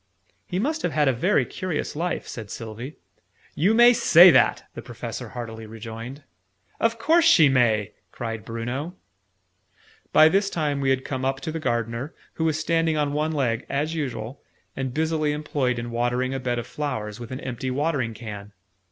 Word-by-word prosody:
"He 180 - -3
must 305 +10 -1
have 170 - -1
had 150 0 +2
a 135 - +4
very 175 - +2
curious 180 -7 -4
life," 175 +3 -2
said 110 -4 -7
Sylvie. 115 +7 -7 0.6
"You 195 +9 +2
may 240 +1 +8
say 180 -7 +8
that!" - - +3
the - - -7
Professor - - -7
heartily 115 -2 -7
rejoined. 115 +5 -8 0.6
"Of 230 0 +1
course 325 +9 +3
she 165 - +6
may!" 110 -5 +2 0.2
cried 115 -3 -5
Bruno. 120 - -4 1.2
By 155 - +7
this 195 +4 +2
time 150 -5 -1
we 135 - +1
had 130 0 +1
come 130 -2 -3
up 135 0 0
to 160 - -4
the 165 - -4
Gardener, 120 +1 -2 0.2
who 160 - -2
was 155 -1 +1
standing 165 0 +1
on 145 -1 0
one 155 +2 0
leg, 130 -6 0
as 150 +4 -1
usual, 130 -5 -4 0.3
and 130 -1 -3
busily 155 +1 0
employed 145 -4 -1
in 120 0 -5
watering 120 +2 0
a 135 - -2
bed 125 -1 -2
of 120 - -3
flowers 115 -7 -4
with 120 -1 -8
an 130 - -5
empty 130 0 -4
watering 135 -4 -1
can. 105 -3 -8
135 Hz, 180 wpm, -24 LUFS, 120-160 Hz, 1.2 s, may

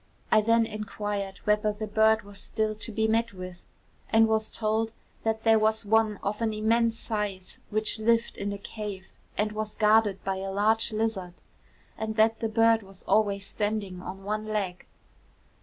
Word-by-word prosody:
I 215 - +6
then 230 +1 +3
inquired 205 -2 -4
whether 210 0 +2
the 210 +1 -5
bird 220 +1 +3
was 200 0 -10
still 215 +2 -1
to 215 +2 -6
be 220 +1 +1
met 230 +1 +1
with; 185 -1 -9 0.5
and 225 0 +5
was 220 0 +1
told 220 0 -1 0.3
that 220 0 -1
there 225 -1 +5
was 220 0 +1
one 220 0 +3
of 210 +3 -2
an 225 -1 +1
immense 225 +1 +2
size 205 -5 -4
which 215 +1 0
lived 230 +1 +2
in 205 - -3
a 200 - -4
cave, 200 -2 -7 0.2
and 210 0 +1
was 215 0 -4
guarded 215 -2 +3
by 190 0 -1
a 195 0 -4
large 220 +3 +2
lizard, 215 -5 -2 0.6
and 220 0 -3
that 220 0 +3
the 225 - -1
bird 225 0 +4
was 195 -2 -15
always 200 -2 +2
standing 205 -3 -2
on 190 +1 -8
one 215 +2 -3
leg. 200 -4 -3
215 Hz, 175 wpm, -28 LUFS, 205-220 Hz, 0.6 s, I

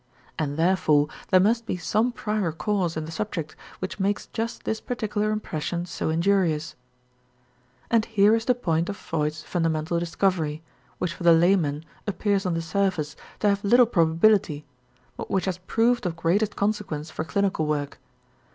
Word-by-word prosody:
And 145 -2 -2
therefore 160 -4 +3 0.2
there 185 - +6
must 230 +4 +2
be 185 - -2
some 215 +8 +1
prior 210 -6 -1
cause 170 +1 -1
in 155 - -3
the 160 - -7
subject 165 -4 -4 0.2
which 185 +2 -5
makes 200 +1 0
just 230 +1 -4
this 220 - -2
particular 215 -4 -2
impression 175 -5 -3
so 175 - -3
injurious; 165 -2 +1 1.2
and 230 -2 +3
here 210 -1 +4
is 225 0 +1
the 250 - +3
point 170 -7 0
of 200 - -4
Freud's 155 -1 -3
fundamental 165 -1 -1
discovery, 165 -3 -1 0.3
which 180 -2 -2
for - - -14
the 170 -1 +6
layman 165 -3 +2 0.2
appears 200 -1 0
on 175 - 0
the 165 - -2
surface 165 -3 -1 0.3
to 210 - +4
have 200 0 0
little 245 +4 +6
probability 165 -4 +2 0.5
but - - -6
which 190 - 0
has 185 -2 -2
proved 225 +3 +1
of 165 - -3
greatest 175 +6 +1
consequence 200 -7 -2
for 160 - -3
clinical 195 -3 0
work. 145 -2 -2
180 Hz, 160 wpm, -25 LUFS, 160-210 Hz, 1.2 s, there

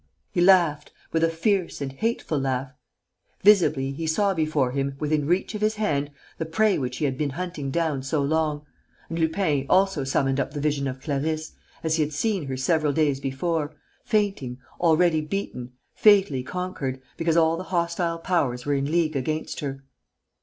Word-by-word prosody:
He 175 - 0
laughed, 175 -5 +4 0.2
with 165 0 +1
a 165 - +4
fierce 180 +2 0
and 140 -2 -3
hateful 220 - -1
laugh. 135 0 -2 0.7
Visibly, 165 -10 +4
he 160 +4 -4
saw 195 +5 +2
before 155 -6 +1
him, 135 +1 -2
within 150 -1 0
reach 180 +6 +1
of 210 - -5
his 215 +1 +2
hand, 145 -9 0 0.3
the 160 - -1
prey 200 +4 +2
which 125 -2 -3
he 150 - 0
had 130 -2 -2
been 150 -2 0
hunting 155 -1 -4
down 155 -2 0
so 135 +3 -1
long. 150 0 0 0.4
And 165 +1 -3
Lupin 160 -4 +1
also 190 -6 +3
summoned 135 0 +1
up 135 +2 -2
the - - -2
vision 145 -1 0
of 130 0 -5
Clarisse, 155 +2 -2 0.3
as 160 0 +1
he - - +2
had 150 0 -4
seen 180 0 -1
her 130 -1 -3
several 150 +2 +1
days 145 -3 +2
before, 150 +3 -2 0.3
fainting, 195 - 0 0.2
already 165 -1 +3
beaten, 150 -8 -5 0.2
fatally 195 -11 +4
conquered, 140 -4 -4 0.2
because 165 0 +1
all 165 0 +4
the 185 +2 -6
hostile 170 -1 -1
powers 160 -8 -1
were 145 - +1
in 140 +1 -1
league 165 -2 +1
against 155 +4 -2
her. 135 -2 -5
155 Hz, 175 wpm, -25 LUFS, 140-175 Hz, 0.7 s, laughed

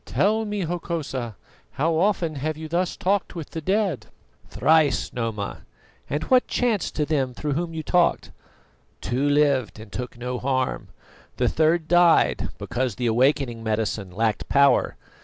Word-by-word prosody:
Tell 220 +2 +1
me, 205 -1 -3
Hokosa, 160 - -3 0.4
how 165 +4 +1
often 175 -2 +1
have 150 +2 -3
you 160 0 -6
thus 175 +2 -1
talked 195 0 0
with 165 -4 -7
the 160 - -5
dead?" 190 - 0 0.4
"Thrice, 155 -3 +2
Noma." 115 -4 -3 0.5
"And 145 +3 -2
what 255 -1 +3
chanced 230 -7 0
to 150 - 0
them 135 -5 -1
through 150 +2 -2
whom 165 +2 -3
you 160 - -4
talked?" 175 +2 +1 0.7
"Two 130 +7 -1
lived 140 -6 +2
and 110 -1 -11
took 125 -1 -6
no 125 +1 -4
harm; 130 -1 -1 0.5
the - - +2
third 160 +1 +2
died, 175 -1 +4
because 125 -3 -2
the 125 - -3
awakening 120 0 +1
medicine 110 -3 -2
lacked 110 +3 -1
power. 140 0 +4
150 Hz, 150 wpm, -24 LUFS, 125-170 Hz, 0.7 s, died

